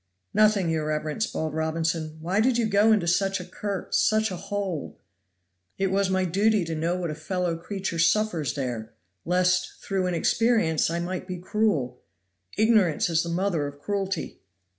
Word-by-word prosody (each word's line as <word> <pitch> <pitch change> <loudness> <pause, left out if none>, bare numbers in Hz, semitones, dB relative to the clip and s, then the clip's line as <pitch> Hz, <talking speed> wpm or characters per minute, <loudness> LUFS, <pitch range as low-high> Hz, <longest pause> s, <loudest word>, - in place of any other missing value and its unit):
"Nothing, 210 -5 +3
your 155 -1 -1
reverence," 155 +7 -1
bawled 155 -1 -3
Robinson. 160 0 -2
"Why 180 +5 0
did 245 +1 +3
you 235 - +2
go 210 +1 +4
into 210 -5 +3
such 195 +3 +1
a 180 - -7
cur 200 -1 -4
into - - -13
such 215 -1 +2
a - - -3
hole?" 195 -3 -4 0.8
"It 195 -1 0
was 195 0 +1
my 190 0 +1
duty 200 +2 +2
to 165 - -4
know 165 +3 -1
what 175 -3 -3
a - - -3
fellow 175 +2 -2
creature 180 0 -4
suffers 170 - +2
there, 120 -5 -4 0.3
lest, 180 +1 +2
through 190 -2 -1
inexperience, 180 -2 +2
I 170 - -1
might 180 +2 -4
be 185 -1 -4
cruel. 180 - -1 0.6
Ignorance 210 -8 +3
is 160 -1 +3
the 170 - -4
mother 170 -4 0
of 145 0 -9
cruelty!" 195 +1 -3
180 Hz, 170 wpm, -26 LUFS, 160-200 Hz, 0.8 s, go